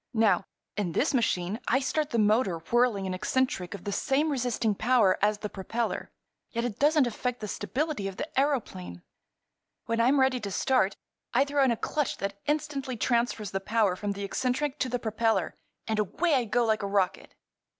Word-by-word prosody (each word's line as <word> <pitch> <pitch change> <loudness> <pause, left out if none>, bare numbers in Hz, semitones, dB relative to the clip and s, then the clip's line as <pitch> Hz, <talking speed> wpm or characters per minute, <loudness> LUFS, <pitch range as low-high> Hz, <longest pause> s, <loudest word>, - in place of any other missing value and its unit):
"Now, 220 -3 +3 0.3
in 195 -5 -2
this 295 - +1
machine 210 -5 0
I 260 - +3
start 300 +2 -1
the 235 - -1
motor 210 -4 +3
whirling 220 +3 +1
an 185 - -2
eccentric 190 -2 -1
of 195 - -10
the 200 - -3
same 280 +9 +1
resisting 245 -5 0
power 220 -3 +3
as 210 +1 +3
the 210 - -4
propeller, 220 +4 -3 0.4
yet 235 0 -2
it 230 -5 -4
doesn't 295 -1 +4
affect 245 +1 -3
the 210 - -5
stability 225 - -2
of 195 -1 -7
the - - -3
aëroplane. 210 - -1 0.8
When 230 0 0
I'm 265 +4 +4
ready 265 -1 +3
to 210 -3 -4
start 200 0 +1 0.4
I 270 +3 +5
throw 285 0 +2
in 265 - +4
a 235 - +1
clutch 295 +3 -1
that 200 0 -4
instantly 290 -4 -1
transfers 235 -4 0
the 195 - -1
power 210 -1 +1
from 205 +2 -3
the 200 0 -6
eccentric 260 +7 -1
to 260 - 0
the 250 - 0
propeller—and 220 -1 -2
away 310 - +1
I 255 -4 +3
go 240 +2 +1
like 220 -1 +1
a 200 - -2
rocket." 195 -2 -1
230 Hz, 185 wpm, -28 LUFS, 200-260 Hz, 0.8 s, I